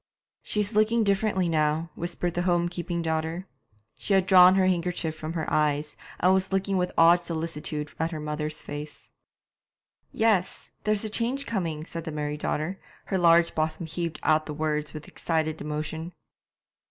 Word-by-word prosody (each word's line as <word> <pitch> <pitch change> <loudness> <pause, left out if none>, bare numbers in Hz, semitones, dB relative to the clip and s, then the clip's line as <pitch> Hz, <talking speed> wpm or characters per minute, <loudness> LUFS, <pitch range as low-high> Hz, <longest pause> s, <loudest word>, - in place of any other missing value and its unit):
'She's 210 +1 -1
looking 220 +2 +3
differently 200 -2 +1
now,' 155 0 0
whispered 175 0 -3
the 175 - -1
home 175 -1 +2
keeping 175 -1 -3
daughter. 160 +2 -2 0.5
She 200 - +1
had 190 -1 +3
drawn 185 -1 +7
her 190 -1 +3
handkerchief 175 -3 0
from 155 +1 -5
her 160 -2 -2
eyes, 150 0 0 0.2
and 185 +2 +4
was 190 0 0
looking 195 +1 0
with 180 0 0
awed 170 +2 +7
solicitude 160 -3 -4
at 160 +1 +1
her 160 -2 -5
mother's 150 0 -4
face. 145 +1 -8 1.0
'Yes, 215 -5 0
there's 215 0 +2
a - - -2
change 250 +5 +1
coming,' 165 -8 -3
said 165 -1 -6
the 160 - -4
married 150 0 -3
daughter; 155 +6 -2 0.3
her 190 - -1
large 170 0 +5
bosom 155 +1 -1
heaved 165 0 -4
out 155 +1 +2
the 150 - -5
words 150 -1 -1
with 155 -1 -9
excited 160 -1 -2
emotion. 155 +3 -4
165 Hz, 165 wpm, -26 LUFS, 155-185 Hz, 1.0 s, drawn